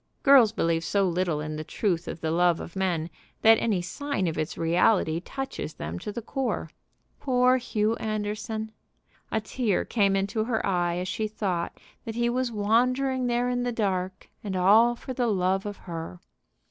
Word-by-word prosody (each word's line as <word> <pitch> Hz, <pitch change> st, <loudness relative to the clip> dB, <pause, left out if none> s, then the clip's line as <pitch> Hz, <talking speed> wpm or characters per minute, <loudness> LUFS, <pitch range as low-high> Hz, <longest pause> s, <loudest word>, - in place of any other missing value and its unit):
Girls 270 Hz, -6 st, +7 dB
believe 165 Hz, -6 st, 0 dB
so 195 Hz, +3 st, +1 dB
little 175 Hz, -3 st, 0 dB
in 155 Hz, 0 st, -4 dB
the 155 Hz, -, -4 dB
truth 175 Hz, +1 st, -1 dB
of 165 Hz, -, -6 dB
the 160 Hz, -, -1 dB
love 175 Hz, 0 st, +3 dB
of 170 Hz, -, -8 dB
men 180 Hz, -4 st, 0 dB, 0.4 s
that 225 Hz, 0 st, +7 dB
any 200 Hz, -6 st, 0 dB
sign 285 Hz, +2 st, -2 dB
of 165 Hz, -2 st, -1 dB
its 155 Hz, -, -3 dB
reality 165 Hz, 0 st, +2 dB
touches 270 Hz, -, -6 dB
them 80 Hz, +3 st, -5 dB
to -, -, -5 dB
the 235 Hz, +2 st, -6 dB
core. 270 Hz, +3 st, -3 dB, 0.5 s
Poor 255 Hz, -1 st, +3 dB
Hugh 220 Hz, -2 st, 0 dB
Anderson! 215 Hz, +1 st, -3 dB, 0.6 s
A 220 Hz, -, +1 dB
tear 220 Hz, -2 st, -1 dB
came 200 Hz, -4 st, +2 dB
into 200 Hz, +3 st, 0 dB
her 225 Hz, -2 st, -1 dB
eye 175 Hz, -3 st, 0 dB
as 180 Hz, +1 st, -3 dB
she 215 Hz, +3 st, -2 dB
thought 195 Hz, -5 st, -3 dB, 0.2 s
that 225 Hz, -2 st, -6 dB
he 240 Hz, 0 st, +1 dB
was 255 Hz, 0 st, -1 dB
wandering 250 Hz, +5 st, +1 dB
there 240 Hz, 0 st, +1 dB
in 245 Hz, 0 st, 0 dB
the 245 Hz, 0 st, -1 dB
dark, 190 Hz, -4 st, -2 dB, 0.2 s
and 200 Hz, -3 st, -3 dB
all 215 Hz, +6 st, +5 dB
for 260 Hz, -, -7 dB
the 245 Hz, -1 st, 0 dB
love 190 Hz, -1 st, +1 dB
of 205 Hz, -, -6 dB
her. 165 Hz, 0 st, -7 dB
205 Hz, 180 wpm, -26 LUFS, 175-235 Hz, 0.6 s, Girls